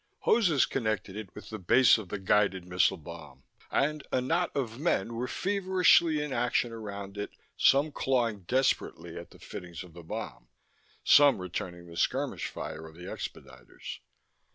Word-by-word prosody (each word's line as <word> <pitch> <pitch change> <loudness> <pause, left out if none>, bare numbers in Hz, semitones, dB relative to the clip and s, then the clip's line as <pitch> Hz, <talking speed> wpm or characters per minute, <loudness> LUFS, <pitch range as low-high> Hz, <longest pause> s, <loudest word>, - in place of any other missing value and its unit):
Hoses 175 - +4
connected 110 -6 -2
it 105 -4 -8
with 105 - -10
the 110 - -5
base 120 +6 +5
of 100 -5 -9
the 105 - -3
guided 95 -1 +2
missile 90 0 +2
bomb; 75 -5 -11 0.3
and 150 +2 +1
a - - +2
knot 165 +7 +1
of 120 -4 -2
men 120 - 0
were 120 +2 -3
feverishly 185 -4 +3
in 150 -2 -4
action 120 0 +1
around 100 -3 -7
it, 105 - -3 0.3
some 140 +3 +4
clawing 120 -7 0
desperately 85 -10 0
at 85 0 -8
the - - -16
fittings 85 -2 -8
of 90 -3 -14
the 85 - -10
bomb, 80 -6 -7 0.6
some 145 -4 +7
returning 90 -1 -5
the 85 -1 -12
skirmish - - -1
fire 80 +1 -7
of 80 - -14
the 90 - -11
expediters. - - -8
110 Hz, 160 wpm, -29 LUFS, 90-135 Hz, 0.6 s, some